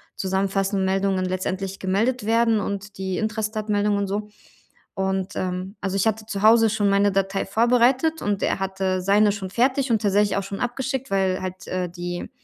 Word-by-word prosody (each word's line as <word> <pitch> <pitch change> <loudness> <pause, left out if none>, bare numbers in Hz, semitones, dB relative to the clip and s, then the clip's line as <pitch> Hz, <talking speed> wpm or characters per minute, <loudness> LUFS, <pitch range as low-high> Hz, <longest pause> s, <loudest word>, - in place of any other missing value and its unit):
zusammenfassenden 195 0 0
Meldungen 190 0 +1
letztendlich 185 +1 -3
gemeldet 215 +5 0
werden 230 -1 +3
und 200 0 -5
die 190 -1 -2
Intrastat-Meldung 215 -1 -1
und 200 - -1
so. 210 +2 -3 0.6
Und, 190 0 -2
ähm, 185 +2 -3
also, 195 -1 -2
ich 195 +2 +1
hatte 220 0 -1
zu 205 -2 -4
Hause 225 0 +6
schon 205 -1 +1
meine 200 0 +3
Datei 195 0 0
vorbereitet 250 +9 +2
und 205 -1 -1
er - - 0
hatte 190 -1 -1
seine 205 +2 +4
schon 195 -2 -5
fertig 260 +5 +1
und 220 - +2
tatsächlich 205 0 +2
auch 200 - -1
schon 195 0 -6
abgeschickt, 265 +2 -3
weil 190 -1 +1
halt, 185 0 -6
äh, 185 -1 -2
die 175 0 -5
200 Hz, 175 wpm, -23 LUFS, 190-220 Hz, 0.6 s, Hause